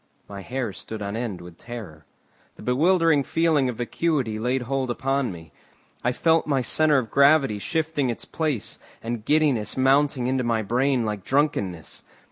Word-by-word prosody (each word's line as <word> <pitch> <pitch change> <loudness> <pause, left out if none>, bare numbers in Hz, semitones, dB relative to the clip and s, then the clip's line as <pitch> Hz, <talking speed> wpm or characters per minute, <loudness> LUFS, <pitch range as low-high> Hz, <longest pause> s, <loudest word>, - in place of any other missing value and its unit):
My 100 -1 -8
hair 125 -1 -3
stood 110 +2 -7
on 100 +1 -4
end 115 -5 -4
with 85 -1 -13
terror. 110 -11 -9 0.5
The - - -13
bewildering 160 - +3
feeling 155 -4 +2
of 125 - -4
vacuity 120 -2 -1
laid 125 +3 0
hold 135 +1 -2
upon 135 0 -1
me. 80 -3 -11 0.5
I 125 - +2
felt 160 +5 +2
my 140 -3 +1
centre 155 +2 +3
of 115 -5 -2
gravity 140 -6 +4
shifting 160 +1 -1
its 120 - -4
place, 150 -9 -3 0.2
and 115 -1 -4
giddiness 140 -7 +1
mounting 135 0 +3
into 130 0 0
my 115 -2 0
brain 125 +3 +1
like 105 -3 -3
drunkenness. 100 - -1
125 Hz, 160 wpm, -24 LUFS, 110-145 Hz, 0.5 s, gravity